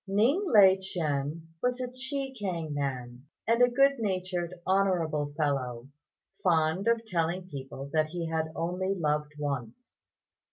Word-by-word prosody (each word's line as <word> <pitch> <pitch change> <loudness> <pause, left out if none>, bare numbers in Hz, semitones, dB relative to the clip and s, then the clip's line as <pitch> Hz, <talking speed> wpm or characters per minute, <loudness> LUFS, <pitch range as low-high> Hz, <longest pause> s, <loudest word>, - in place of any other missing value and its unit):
Ning 235 - +3
Lai 195 - +7
ch'ên 160 -5 -2 0.2
was 250 0 0
a 250 - -2
Chekiang 255 - -4
man, 130 -2 -4 0.2
and 230 +2 +3
a 245 - +7
good 275 +2 +4
natured, 185 -4 -1
honourable 175 -6 +1
fellow, 135 -5 -1 0.5
fond 165 +2 +2
of 230 0 +2
telling 175 -1 -1
people 135 -3 -7
that 155 -1 +3
he 170 +1 -4
had 160 -1 -1
only 180 +3 -1
loved 150 -3 -1
once. 145 - -5
175 Hz, 130 wpm, -29 LUFS, 150-210 Hz, 0.5 s, Lai